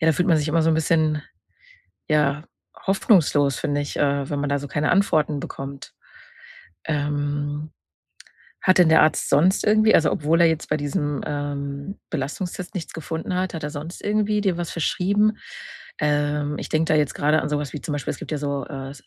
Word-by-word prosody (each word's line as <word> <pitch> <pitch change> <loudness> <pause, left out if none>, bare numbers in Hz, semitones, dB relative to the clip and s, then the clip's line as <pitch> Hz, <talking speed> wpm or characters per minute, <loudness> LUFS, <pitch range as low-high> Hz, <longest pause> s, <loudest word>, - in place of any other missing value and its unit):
Ja, 160 - +1
da - - +5
fühlt 180 +5 0
man 165 - +5
sich 150 0 -1
immer 165 +1 +2
so 165 - +3
'n - - +3
bisschen, 155 -1 +1 0.9
ja, 150 -1 +1 0.4
hoffnungslos, 160 - +3
finde 145 0 -1
ich, 145 - -5
äh, 140 -1 0
wenn 145 -1 -2
man 145 0 -1
da 140 0 +1
so 145 - -7
keine 145 +1 0
Antworten 155 -6 +2
bekommt. 135 0 -8 0.9
Ähm, 145 0 -2 0.9
hat 185 0 +4
denn 175 - +6
der 160 - +6
Arzt 155 - +2
sonst 170 +7 +3
irgendwie 215 +1 +4
also, 160 - +5
obwohl 160 +3 +1
er 170 - +7
jetzt 160 0 -2
bei 150 - +1
diesem, 145 0 -2
ähm, 145 +3 -4
Belastungstest 175 +6 -4
nichts 175 - -5
gefunden 160 +2 -4
hat, 185 -1 -1
hat 160 - -5
er 150 - -3
sonst 155 +4 -7
irgendwie 210 0 +1
dir 190 -4 0
was 175 -1 -4
verschrieben? 205 +6 +1 0.6
Ähm, 145 0 0
ich - - -5
denke 155 0 +1
da 155 - +4
jetzt 145 -2 0
grade 150 +2 +2
an - - -2
so 150 -1 0
was 145 -2 -5
wie 150 - -5
zum 150 - -5
Beispiel, 145 - -3
es - - -9
gibt - - -7
ja 150 - -1
so 140 -1 -3
äh, 135 -3 -7
150 Hz, 200 wpm, -23 LUFS, 145-170 Hz, 0.9 s, er